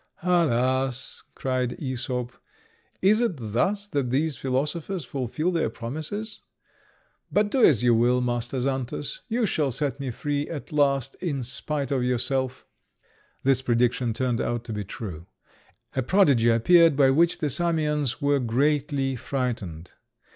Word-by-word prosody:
"Alas!" 130 -7 +1
cried 130 -2 -1
Æsop, 125 -3 -3 0.7
"is 210 +4 +5
it 235 -6 +1
thus 130 - -1
that 140 -7 -1
these 145 +4 +1
philosophers 150 +7 -2
fulfil 135 +7 -2
their 165 -9 0
promises? 155 - -6 0.9
But 205 0 +2
do 260 - +2
as 125 -7 +5
you 120 -1 +5
will, 120 +2 +3
Master 120 +1 -1
Xantus, 135 - -2
you 235 0 +1
shall 155 -7 0
set 140 +2 -2
me 135 -2 -3
free 145 +4 -2
at 150 -4 -7
last 140 -3 +1
in 145 -8 -2
spite 140 +3 -2
of 135 -2 +1
yourself." 130 +1 -1 0.8
This 130 -1 +3
prediction 120 -1 +1
turned 120 +1 -1
out 120 0 -2
to 115 - -6
be 105 -1 -3
true. 90 -4 -7 0.7
A 130 - +1
prodigy 135 - +4
appeared, 165 +7 +5
by 135 -1 +5
which 165 +5 +3
the 150 -2 -1
Samians 150 -5 0
were 140 0 +2
greatly 135 +2 0
frightened. 115 - -4
135 Hz, 140 wpm, -25 LUFS, 125-150 Hz, 0.9 s, is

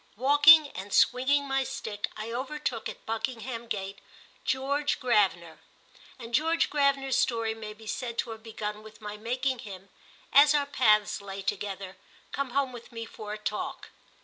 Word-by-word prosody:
Walking 290 +4 +7
and 195 -2 -8
swinging 280 +6 +3
my 270 0 +1
stick, 210 -5 -4
I 215 +2 -5
overtook, 255 -1 -3
at - - -11
Buckingham 230 +1 -4
Gate, 200 -3 -4 0.4
George 280 +3 0
Gravener, 195 - +1 0.6
and 235 -2 -10
George 325 +5 +2
Gravener's 280 -2 +2
story 230 -2 +1
may 215 -1 -8
be 220 +1 -15
said 235 +1 -4
to 235 - -1
have 220 0 -8
begun 210 -1 -5
with 215 0 -14
my 210 -1 -6
making 250 +4 -2
him, 195 -3 -10 0.4
as 290 +2 +7
our 290 -1 +2
paths 215 -8 +3
lay 195 0 -7
together, 195 -1 -4 0.3
come 275 -1 -2
home 270 +1 0
with 240 0 -11
me 230 -1 -6
for 210 -1 -8
a - - -5
talk. 210 0 -4
230 Hz, 160 wpm, -28 LUFS, 210-270 Hz, 0.6 s, Walking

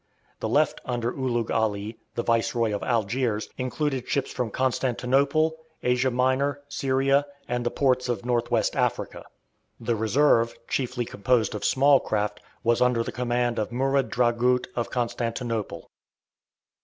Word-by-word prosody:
The - - -2
left - - +2
under 120 -1 -2
Ulugh 120 -4 -1
Ali, 110 0 -1 0.2
the 120 - -1
Viceroy 115 -1 +1
of 100 - -2
Algiers, 115 -1 0
included 130 0 -2
ships 140 - 0
from 125 -3 -2
Constantinople, 135 +5 +1 0.3
Asia 125 +1 +2
Minor, 130 +3 +1
Syria, 135 +1 +1 0.2
and 125 0 -1
the 120 - +1
ports 130 -2 +1
of 120 0 -2
North 120 -1 0
west 115 -3 +1
Africa. - - -1 0.5
The 115 0 -1
reserve, 115 +1 +3
chiefly 125 -2 -1
composed 110 +1 +1
of 105 - -5
small 140 +1 +5
craft, 105 -1 -2 0.2
was 115 0 +2
under 125 -2 +3
the - - -5
command 120 -1 0
of 110 - -2
Murad 135 +2 +1
Dragut 125 +1 +2
of 120 - -2
Constantinople. 115 -2 -3
125 Hz, 140 wpm, -26 LUFS, 115-130 Hz, 0.5 s, small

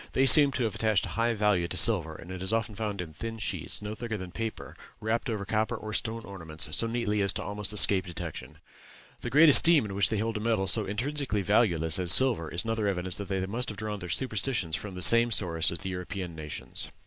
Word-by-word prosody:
They 135 - +2
seem 145 +1 +8
to 125 - -2
have 110 -3 -2
attached 110 -2 0
a - - -8
high 115 0 -1
value 105 -5 0
to 90 - -5
silver, 90 -9 +4
and 85 +4 -12
it 95 -1 -8
is 95 - +1
often 115 -1 -2
found 105 -2 -5
in 80 -3 -9
thin 115 +6 -7
sheets, 105 - -4
no 105 +1 -6
thicker 110 -1 -6
than 90 -2 -9
paper, 110 +2 -7 0.2
wrapped 115 +3 -3
over 105 -3 -4
copper 110 +3 -2
or 110 -1 -8
stone 115 +1 -4
ornaments 80 -7 -6
so 115 - +1
neatly 115 -3 -2
as 100 0 +1
almost 105 0 -5
to 105 - -6
escape 95 -2 +3
detection. 85 -2 -8 0.6
The - - -6
great 155 +4 +5
esteem 155 -1 +8
in 100 - -7
which 100 0 +1
they 110 - -2
held 110 +1 -3
a - - -5
metal 110 -3 -1
so 105 +1 +2
intrinsically 120 0 -3
valueless 90 -6 0
as 90 -2 +3
silver, 115 -12 +4
is 85 - -2
another 115 -2 -2
evidence 95 -2 -2
that 100 - -7
they 95 -1 -3
must 120 +6 -4
have 105 - -8
drawn 105 0 -5
their 90 -2 -8
superstitions 110 -7 -2
from 100 -3 -8
the 90 - -1
same 115 +3 +7
source 85 -7 +3
as 85 - -4
the 95 - -6
European 90 -1 -7
nations. 75 -2 -6
105 Hz, 235 wpm, -27 LUFS, 90-115 Hz, 0.6 s, seem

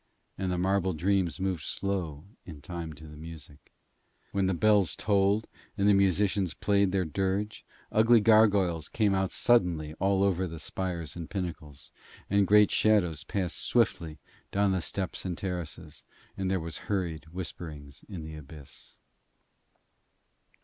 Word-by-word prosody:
And 95 -1 -2
the 90 - -1
marble 95 0 +1
dreams 95 +2 0
moved 95 -4 -1
slow 90 -8 -3 0.2
in 80 -4 -10
time 85 0 -6
to 75 +2 -13
the 75 - -11
music. 75 -3 -11 0.6
When 100 -1 +1
the 95 - +1
bells 100 -2 +3
tolled 100 +1 +2 0.3
and 100 0 +2
the 105 - +6
musicians 100 -1 +2
played 100 -2 +2
their 95 -2 +1
dirge, 95 +6 -2 0.3
ugly 115 +2 +5
gargoyles 100 -7 +4
came 105 -3 +1
out 95 -1 +1
suddenly 85 -10 +2
all 95 0 +2
over 95 -2 +1
the 80 -1 -8
spires 85 -3 -4
and 85 -2 -7
pinnacles, 75 -7 -6 0.4
and 100 -1 +3
great 105 +1 +6
shadows 95 -8 +2
passed 95 -4 -2
swiftly 80 -2 +1 0.3
down 100 0 +2
the 95 -1 0
steps 95 +2 -3
and 90 -2 -3
terraces, 85 -4 -5 0.3
and 95 -1 -2
there 95 0 +1
was 80 -1 -6
hurried 85 -6 -2
whispering 80 -4 -7 0.2
in 90 -6 -6
the 80 0 -8
abyss. 75 -2 -11
95 Hz, 145 wpm, -29 LUFS, 80-100 Hz, 0.6 s, the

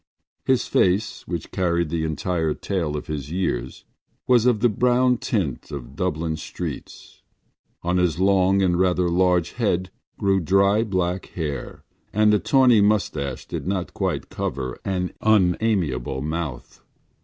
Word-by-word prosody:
His 130 -1 +2
face, 95 +4 +1
which 85 -3 -5
carried 85 -3 0
the 80 0 -1
entire 80 0 -1
tale 85 -7 -2
of - - -6
his 75 -3 -5
years, 85 -9 -3 0.4
was 125 -1 +4
of 115 -4 +2
the 120 - +5
brown 125 +3 +2
tint 90 - -2
of 65 -1 -8
Dublin 80 -2 -2
streets. 75 - -7 0.6
On 90 +1 +1
his 90 -2 +1
long 95 0 +3
and 90 -1 +2
rather 90 -1 +2
large 90 -1 +2
head 95 -6 -1 0.3
grew 95 -1 +2
dry 100 +5 +3
black 95 -3 -1
hair 75 -6 -5 0.3
and 105 0 +4
a 105 - +4
tawny 120 +2 +4
moustache 80 -10 0
did - - -5
not 95 -2 -2
quite - - -2
cover 65 -1 -4
an 90 -2 -2
unamiable 90 - +1
mouth. 75 -5 -5
90 Hz, 140 wpm, -23 LUFS, 80-100 Hz, 0.6 s, the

